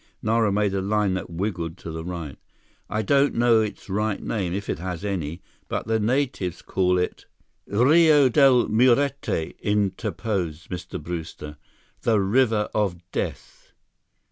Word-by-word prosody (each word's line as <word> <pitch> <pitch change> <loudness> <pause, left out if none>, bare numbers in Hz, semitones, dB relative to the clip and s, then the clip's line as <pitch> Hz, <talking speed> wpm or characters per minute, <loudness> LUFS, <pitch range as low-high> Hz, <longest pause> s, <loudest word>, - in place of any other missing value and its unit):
Nara 110 -1 +2
made 100 0 +1
a 95 - 0
line 105 0 +1
that 90 -2 -4
wiggled 85 -2 -3
to 85 - -8
the 80 0 -5
right. 85 -5 -6 0.5
"I 110 0 -1
don't 140 +6 +3
know 115 -1 +4
its 105 -1 -5
right 105 +1 -1
name—if 100 -1 -3
it - - -2
has 90 +1 -5
any—but 85 -4 -5
the 110 +1 +1
natives 120 - -1
call 90 -1 +1
it—" 90 - -3 0.4
"Rio 145 - +5
Del 130 -1 +5
Muerte," 125 - +2
interposed 100 -4 -2
Mr. 90 -1 -5
Brewster. 80 -3 -7 0.4
"The 110 -3 +2
River 110 +1 +2
of 100 -5 0
Death." - - -5
105 Hz, 135 wpm, -24 LUFS, 90-115 Hz, 0.5 s, Rio